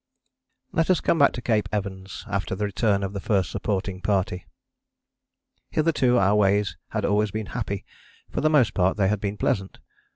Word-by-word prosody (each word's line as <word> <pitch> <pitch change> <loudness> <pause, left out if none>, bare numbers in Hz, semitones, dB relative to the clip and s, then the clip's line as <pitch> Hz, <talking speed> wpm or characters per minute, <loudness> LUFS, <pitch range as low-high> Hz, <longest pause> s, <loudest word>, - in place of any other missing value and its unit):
Let 165 +1 +1
us 185 -4 +4
come 165 - +1
back 140 - +6
to 120 - -6
Cape 110 -3 +1
Evans 95 -2 -5
after 100 -2 -2
the 105 +2 -1
return 100 0 +1
of 95 0 -3
the 100 - -3
First 95 -5 0
Supporting 95 -1 -2
Party. 95 -3 -1 1.2
Hitherto 150 -6 +2
our 100 -1 +4
ways 100 -1 +2
had - - -2
always 105 +1 +2
been 110 +2 -4
happy: 105 -5 -3 0.5
for - - -2
the 155 - +3
most 130 -9 +3
part 95 +1 +2
they 95 -2 +3
had 105 -1 -1
been 105 0 -3
pleasant. 95 -1 -1
100 Hz, 175 wpm, -25 LUFS, 95-110 Hz, 1.2 s, back